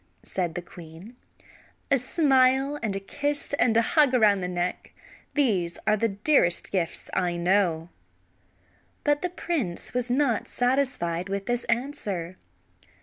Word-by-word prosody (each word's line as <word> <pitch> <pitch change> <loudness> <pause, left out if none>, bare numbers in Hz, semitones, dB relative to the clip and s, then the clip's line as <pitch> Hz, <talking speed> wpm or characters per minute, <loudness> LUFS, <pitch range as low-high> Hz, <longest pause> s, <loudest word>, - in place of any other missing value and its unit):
said 175 -4 -3
the 175 - -4
queen. 170 +7 -12 0.8
"A 275 - +5
smile 270 0 +2
and 210 -4 -2
a - - -2
kiss 285 +9 -2
and 225 -2 +3
a 230 - +5
hug 290 -5 +4
around 210 -5 +4
the 180 - -2
neck; 180 0 -3 0.4
these 195 - +1
are 215 +1 +4
the 230 +2 +1
dearest 200 - +1
gifts 175 -4 -3
I 175 -2 0
know." 175 -2 +1 1.1
But 290 0 +2
the 360 - -1
prince 310 - -3
was 250 0 -1
not 250 -3 +1
satisfied 245 -9 -1
with 195 0 -3
this 240 0 -1
answer. 210 - -3
215 Hz, 140 wpm, -26 LUFS, 180-270 Hz, 1.1 s, A